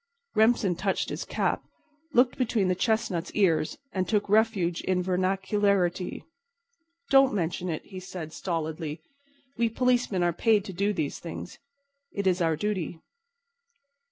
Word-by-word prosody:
Remsen 220 -4 +3
touched 190 +2 -1
his - - -4
cap, - - 0 0.5
looked 245 -1 +4
between 225 -6 +1
the - - +3
chestnut's 190 -3 0
ears, 165 -7 +2 0.2
and 185 -1 -1
took 210 -2 +1
refuge 205 -5 +2
in 185 -1 0
vernacularity. 190 0 0 0.9
"Don't 270 -4 +6
mention 175 0 -1
it," 155 - -4
he 190 -2 -8
said 180 -4 -7
stolidly. 160 -2 -3 0.6
"We 235 -1 +3
policemen 240 -5 +1
are 175 -1 +2
paid 210 +2 +2
to 190 - -6
do 200 +4 +1
these 160 -8 -2
things. 175 +1 -8 0.5
It's 190 -2 +1
our 165 -1 +2
duty." 180 -2 -2
190 Hz, 130 wpm, -27 LUFS, 175-210 Hz, 0.9 s, Don't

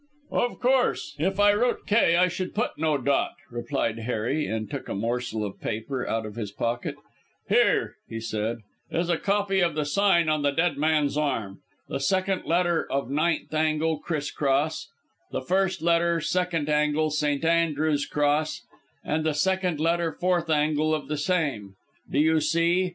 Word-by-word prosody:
"Of 245 - 0
course. 255 0 +1
If 190 +5 0
I 205 0 +6
wrote 240 +4 0
'K' 205 -5 +4
I 180 +1 +5
should 180 +1 -4
put 230 +4 0
no 155 -1 +1
dot," 140 +1 0 0.2
replied 115 -1 -2
Harry, 125 +6 -1
and 110 -1 -3
took - - -6
a - - -3
morsel 115 0 -2
of 100 - -8
paper 125 +4 -3
out 110 -1 -1
of 105 - -7
his 105 -3 -5
pocket. 115 +4 -2 0.5
"Here," - - +2 0.2
said 110 +1 -3 0.3
he, - - -4
"is 170 +1 0
a 170 - +1
copy 200 -1 +1
of 170 -4 +1
the 155 -1 0
sign 170 0 +3
on 155 -1 +1
the 145 - +2
dead 165 +2 +1
man's 150 -1 +1
arm. 115 -10 -2 0.3
The - - -3
second 185 +6 0
letter 175 -1 +1
of 135 -2 -1
ninth 155 +3 0
angle 155 0 +1
criss 150 -3 -3
cross: 145 +2 0 0.4
the - - -3
first 190 -1 0
letter 170 0 +3
second 175 -2 -1
angle 150 +1 +1
St. 150 0 0
Andrew's 155 -3 +1
cross, 150 +1 0 0.4
and 155 +1 -1
the 155 -2 0
second 185 0 0
letter 165 +1 +1
fourth 175 0 0
angle 155 0 +2
of 150 - -6
the 150 - -1
same. 145 - -1 0.3
Do - - -2
you 160 +2 +4
see? 170 +4 +2
155 Hz, 170 wpm, -26 LUFS, 140-170 Hz, 0.5 s, I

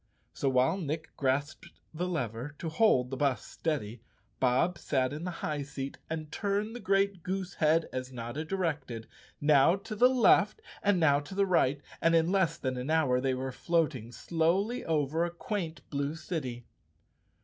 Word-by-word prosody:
So, 140 - 0
while 130 +7 +3
Nick 155 -1 -4
grasped 140 +2 -1 0.3
the 175 +3 -2
lever 135 - -3
to 165 - -4
hold 155 - +3
the 135 - -3
bus 140 -2 0
steady, 125 -8 -3 0.4
Bob 135 +7 +2
sat 130 -2 0
in 155 +4 -5
the - - -2 0.2
high 150 -2 -1
seat 135 -1 -6
and 155 -1 -4
turned 205 +4 -1
the - - -5
great 195 -1 +1
goose 185 +1 -3
head 160 +1 +2
as 130 0 -4
Notta 120 +4 -5
directed, 155 -10 -3 0.3
now 145 +3 +5
to 215 +3 -7
the 245 +4 +6
left 255 - +4 0.2
and 200 -3 +3
now 145 -4 +4
to 145 +6 -9
the 200 0 +3
right, 145 -6 +2 0.2
and 165 0 +4
in 165 +2 +3
less 190 -4 +2
than 130 -1 -2
an 125 +3 -4
hour, 145 -6 +3
they 130 -1 +1
were 130 +1 -3
floating 150 -7 0
slowly 175 - 0
over 155 0 +1
a 175 - 0
quaint 170 -4 -4
blue 140 +1 -1
city. 130 -8 -5
155 Hz, 170 wpm, -30 LUFS, 135-180 Hz, 0.4 s, the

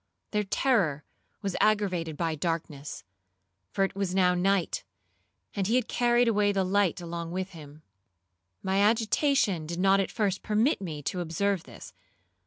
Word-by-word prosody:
Their 210 -1 0
terror 195 - +1 0.4
was 195 -2 -2
aggravated 185 -7 +1
by 165 -2 0
darkness, 155 -2 -4 0.7
for 195 - 0
it 195 - -1
was 195 -2 -2
now 180 -1 +4
night, 185 0 +1 0.7
and 195 -2 0
he 225 - +2
had 250 -3 +1
carried 240 0 +2
away 210 -2 +3
the 195 -1 +1
light 190 -1 +1
along 170 -1 -5
with 185 +2 -4
him. 155 -2 -12 0.8
My 190 +1 +1
agitation 220 - +2
did 170 +2 -4
not 195 +1 +4
at 195 - 0
first 200 -4 -1
permit 215 +4 +1
me 155 -6 -5
to 180 - -2
observe 175 +2 -1
this. 115 -8 -12
190 Hz, 155 wpm, -28 LUFS, 170-205 Hz, 0.8 s, now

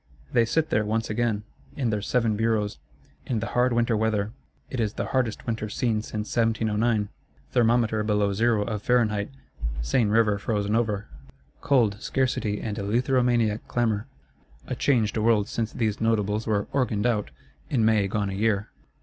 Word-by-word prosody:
They 120 -2 +4
sit 160 +7 0
there 110 - +3
once 110 +1 -1
again, 110 -2 0 0.3
in 125 -5 0
their 105 -1 -1
Seven 115 0 +1
Bureaus, 110 -1 0 0.5
in 120 -4 0
the 110 - -3
hard 125 +1 +3
winter 120 -1 +2
weather: 110 -1 0 0.4
it 130 - -5
is 110 -2 0
the - - -3
hardest 125 -5 0
winter 110 -2 -2
seen 110 0 0
since 110 -1 -5
1709; 110 -2 +1 0.4
thermometer 115 -2 +2
below 105 -1 +1
zero 110 0 +2
of 105 -1 -3
Fahrenheit, 105 -4 +1 0.5
Seine 105 - +2
River 105 -2 +3
frozen 105 0 -1
over. 105 -3 0 0.5
Cold, 115 -8 +3
scarcity 120 -5 0
and 105 -2 -4
eleutheromaniac 120 0 +1
clamour: 115 -2 0 0.6
a - - -4
changed 115 -4 +1
world 110 -2 +3
since 115 -1 -2
these 110 -4 -1
Notables 110 -1 +1
were 105 -2 +1
"organed 120 -6 0
out," 110 -4 +1 0.4
in 115 -5 +2
May 110 -3 +3
gone 100 0 -1
a - - -4
year! 105 +1 0
110 Hz, 160 wpm, -26 LUFS, 105-120 Hz, 0.6 s, They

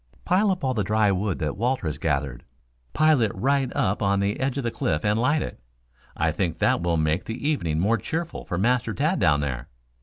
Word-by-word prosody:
"Pile 195 +4 +3
up 185 -5 -1
all 130 -1 +1
the 105 -4 0
dry 105 +1 +2
wood 95 -1 -1
that 75 -2 -2
Walter 120 0 -1
has 75 -2 -3
gathered. 70 -5 -2 0.5
Pile 155 -3 +4
it 110 -3 +2
right 135 +5 +1
up 105 -7 0
on 100 -1 +2
the 100 +1 -1
edge 135 0 -1
of 140 - -2
the 120 - -1
cliff 75 -4 -1
and 105 +1 +2
light 145 +5 +2
it. - - -7 0.6
I 80 +1 +1
think 85 -1 -2
that - - +2
will 85 -1 +1
make 80 +2 0
the 115 +6 -4
evening 85 - 0
more 110 +6 +2
cheerful 165 - -4
for 85 - -4
Master 120 +5 +1
Tad 155 +7 +1
down 75 -3 +3
there." 60 -4 -4
105 Hz, 220 wpm, -25 LUFS, 85-135 Hz, 0.6 s, Pile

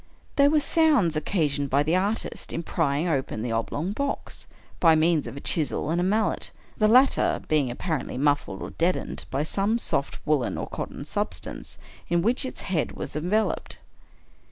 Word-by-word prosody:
They 280 0 +6
were 305 +1 +4
sounds 290 - +3
occasioned 150 -4 0
by 140 +2 +3
the 160 +4 +1
artist 200 +4 -2
in 165 - -3
prying 155 0 0
open 135 -8 -1
the 120 - -2
oblong 145 +10 -2
box, 280 +6 -4 0.3
by 165 -2 +6
means 160 0 +2
of 135 - -7
a - - -4
chisel 155 +1 0
and 175 +2 +1
mallet 215 +1 0
— - - -29
the 215 - +5
latter 255 +5 +4
being 150 -4 +2
apparently 150 +4 -3
muffled, 145 -8 0
or - - -6
deadened, 175 +2 -1
by 135 +2 -1
some 200 +7 +1
soft 140 -11 -1
woolen 150 -5 +1
or - - -3
cotton - - -6
substance - - -4 0.3
in 170 0 +2
which 240 +5 +1
its 260 - -6
head 170 -5 -1
was - - -6
enveloped. 185 +8 0
165 Hz, 170 wpm, -26 LUFS, 145-210 Hz, 0.3 s, They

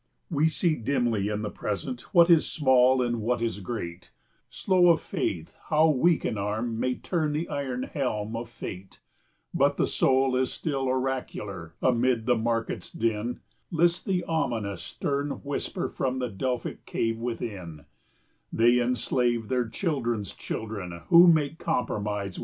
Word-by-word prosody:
40 - - -3
We - - +5
see 160 0 +1
dimly 115 -4 0
in 105 0 -2
the 105 - -3
Present 120 +4 -4
what 170 -1 +6
is 170 -3 +4
small 130 -3 +4
and 120 -2 -1
what 120 +2 0
is 115 -4 -2
great, 90 -5 -6 0.4
Slow 180 -2 +3
of 165 - +5
faith 95 - -3
how 155 +1 +4
weak 155 +3 +3
an 110 - -1
arm 110 +3 -2
may 125 +1 0
turn 155 -4 -1
the 160 +3 -2
iron 130 -3 -3
helm 115 -7 -2
of 115 0 -5
fate, 95 -4 -8 0.5
But - - +2
the - - +3
soul 130 0 +2
is 130 0 +1
still 135 -4 -2
oracular; 125 -10 -3
amid 125 -2 +2
the 125 - +3
market's 115 0 -2
din, 115 +1 -2 0.3
List 170 +1 +2
the 185 -2 +1
ominous 115 - -2
stern 140 0 -2
whisper 145 0 -2
from 130 -1 -2
the 125 -1 -2
Delphic 125 +5 -4
cave 115 0 -1
within, 100 -10 -5 0.7
"They 120 +2 +4
enslave 120 -2 0
their 125 -2 +1
children's 120 - -2
children 100 -6 -5
who 170 +1 +9
make 160 -2 +3
compromise 105 -4 -1
with 95 - -12
sin." - - -5
125 Hz, 155 wpm, -27 LUFS, 110-140 Hz, 0.7 s, who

